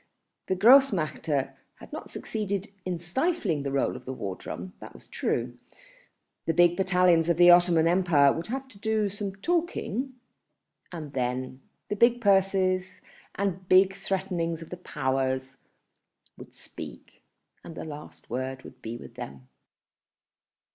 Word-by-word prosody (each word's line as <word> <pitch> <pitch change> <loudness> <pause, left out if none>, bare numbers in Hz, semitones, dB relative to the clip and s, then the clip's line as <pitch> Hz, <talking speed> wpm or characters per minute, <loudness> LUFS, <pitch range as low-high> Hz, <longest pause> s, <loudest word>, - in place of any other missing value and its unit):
The 190 - +1
Grossmächte 180 - +4 0.2
had - - -14
not - - -7
succeeded 200 -2 -3
in 180 -2 -2
stifling 190 - 0
the 140 0 -3
roll 135 -2 0
of 125 0 -10
the 130 - -4
war 100 -7 -4
drum, 90 0 -7
that - - -11
was - - -14
true; 120 +1 -2 0.9
the 165 - +1
big 175 0 +5
battalions 180 -3 +3
of 170 - +2
the 175 0 +8
Ottoman 175 -2 +5
Empire 170 -6 +4
would 165 - -5
have 265 +3 -4
to 205 -5 -16
do 220 -1 0
some 200 -1 -5
talking, 295 - -1 0.8
and 155 -5 -7
then 130 0 -2 0.3
the 205 - -2
big 235 +3 +4
purses 190 -3 +2 0.3
and 190 -2 -2
big 190 +1 +6
threatenings 180 -4 -2
of - - -15
the 180 - -5
Powers 130 -4 -2 0.8
would - - -13
speak - - -10 0.4
and 165 - -10
the - - -6
last 150 -1 -10
word 130 +2 -4
would - - -13
be 115 +1 -5
with - - -12
them. 65 -1 -9
175 Hz, 145 wpm, -27 LUFS, 140-195 Hz, 0.9 s, the